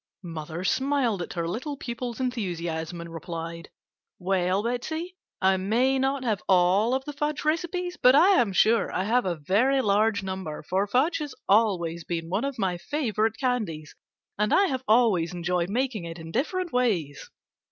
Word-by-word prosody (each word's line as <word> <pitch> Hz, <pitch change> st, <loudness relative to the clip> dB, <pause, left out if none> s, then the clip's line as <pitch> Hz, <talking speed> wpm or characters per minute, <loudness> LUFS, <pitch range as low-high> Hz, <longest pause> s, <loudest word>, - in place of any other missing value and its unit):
Mother 165 Hz, 0 st, -6 dB
smiled 260 Hz, -4 st, +1 dB
at -, -, -5 dB
her 170 Hz, -1 st, -2 dB
little 260 Hz, -, -4 dB
pupil's 240 Hz, -1 st, -5 dB
enthusiasm 175 Hz, -9 st, -3 dB
and 170 Hz, 0 st, -9 dB
replied: 165 Hz, 0 st, -6 dB, 0.5 s
"Well, 185 Hz, +1 st, 0 dB
Betsey, 315 Hz, +10 st, -3 dB, 0.2 s
I 190 Hz, 0 st, +3 dB
may 240 Hz, +8 st, +1 dB
not 270 Hz, 0 st, 0 dB
have 220 Hz, -5 st, 0 dB
all 190 Hz, +6 st, +4 dB
of 265 Hz, 0 st, -3 dB
the 295 Hz, -, -5 dB
fudge 300 Hz, +1 st, -2 dB
recipes, 355 Hz, +3 st, -1 dB
but 255 Hz, +1 st, +7 dB
I 340 Hz, +7 st, +6 dB
am 220 Hz, -5 st, 0 dB
sure 220 Hz, +3 st, +3 dB
I 185 Hz, -, -1 dB
have 240 Hz, +4 st, +1 dB
a 175 Hz, -, 0 dB
very 210 Hz, -, +2 dB
large 210 Hz, -2 st, +2 dB
number, 190 Hz, -6 st, -5 dB
for 190 Hz, +5 st, 0 dB
fudge 265 Hz, -, +2 dB
has 295 Hz, -4 st, -5 dB
always 180 Hz, -6 st, +2 dB
been 165 Hz, 0 st, -4 dB
one 200 Hz, +8 st, 0 dB
of 275 Hz, -2 st, -4 dB
my 185 Hz, -4 st, -1 dB
favorite 225 Hz, -, -1 dB
candies, 210 Hz, -, -2 dB, 0.5 s
and 210 Hz, 0 st, +1 dB
I 395 Hz, -, +5 dB
have 260 Hz, -8 st, -2 dB
always 205 Hz, -7 st, +3 dB
enjoyed 175 Hz, 0 st, -1 dB
making 235 Hz, -4 st, -1 dB
it 165 Hz, 0 st, -7 dB
in 165 Hz, -1 st, -9 dB
different 345 Hz, -, -2 dB
ways." 190 Hz, -, 0 dB
210 Hz, 170 wpm, -26 LUFS, 175-260 Hz, 0.5 s, but